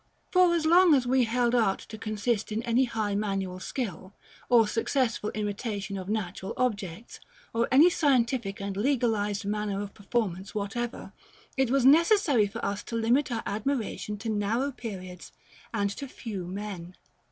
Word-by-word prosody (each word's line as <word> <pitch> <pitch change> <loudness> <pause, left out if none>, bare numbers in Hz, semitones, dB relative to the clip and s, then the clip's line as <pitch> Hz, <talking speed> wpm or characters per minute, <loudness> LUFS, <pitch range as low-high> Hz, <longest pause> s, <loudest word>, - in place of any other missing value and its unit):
For, 365 -2 +5
as 325 -2 0
long 345 0 +6
as 260 -2 +1
we 255 0 +3
held 240 +1 +1
art 220 -6 +3
to 220 - -7
consist 215 0 -2
in 220 +2 -2
any 240 +2 +2
high 220 -4 -2
manual 195 -3 -2
skill, 190 - -5 0.3
or 230 -3 +6
successful 225 -1 0
imitation 205 -1 -3
of 190 0 -6
natural 195 -3 -3
objects, 210 -4 -3 0.3
or 230 +1 +1
any 285 +6 +7
scientific 240 -9 +1
and 200 0 -4
legalized 215 -4 0
manner 205 -1 -2
of 205 -1 -5
performance 200 -3 -3
whatever, 220 +4 -4 0.4
it 265 -2 +1
was 265 0 +2
necessary 310 - +5
for 200 - -5
us 200 0 -2
to 230 - -5
limit 240 +5 +2
our 230 - -2
admiration 215 -1 -2
to 225 +3 -5
narrow 220 +6 0
periods 185 -8 -8 0.4
and 200 -3 0
to 275 +7 -6
few 205 -8 -6
men. 185 -2 -6
220 Hz, 155 wpm, -28 LUFS, 200-250 Hz, 0.4 s, any